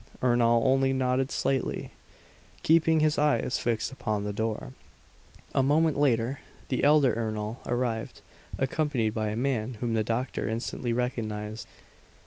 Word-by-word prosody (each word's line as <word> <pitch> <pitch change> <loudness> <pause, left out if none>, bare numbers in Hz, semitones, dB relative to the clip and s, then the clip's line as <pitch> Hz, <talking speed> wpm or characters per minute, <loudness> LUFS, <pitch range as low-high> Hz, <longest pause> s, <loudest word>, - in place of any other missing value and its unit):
Ernol 120 -2 +3
only 135 0 +3
nodded 130 0 +1
slightly, 135 -2 -1 0.7
keeping 160 0 +4
his 155 -1 +2
eyes 150 -3 +1
fixed 115 0 -1
upon 110 -6 -2
the 105 0 -3
door. 110 +4 -3 0.8
A - - +3
moment 155 +3 +3
later, 130 -2 +1 0.3
the 130 - -1
elder 145 -4 +5
Ernol 110 0 -3
arrived, 120 -2 -2 0.4
accompanied 135 -4 0
by 110 -1 -1
a 105 - -3
man 120 -1 -1
whom 115 +1 -2
the 110 -1 +1
doctor 115 +1 -2
instantly 115 +1 -3
recognized. 110 -3 -3
120 Hz, 130 wpm, -28 LUFS, 110-135 Hz, 0.8 s, elder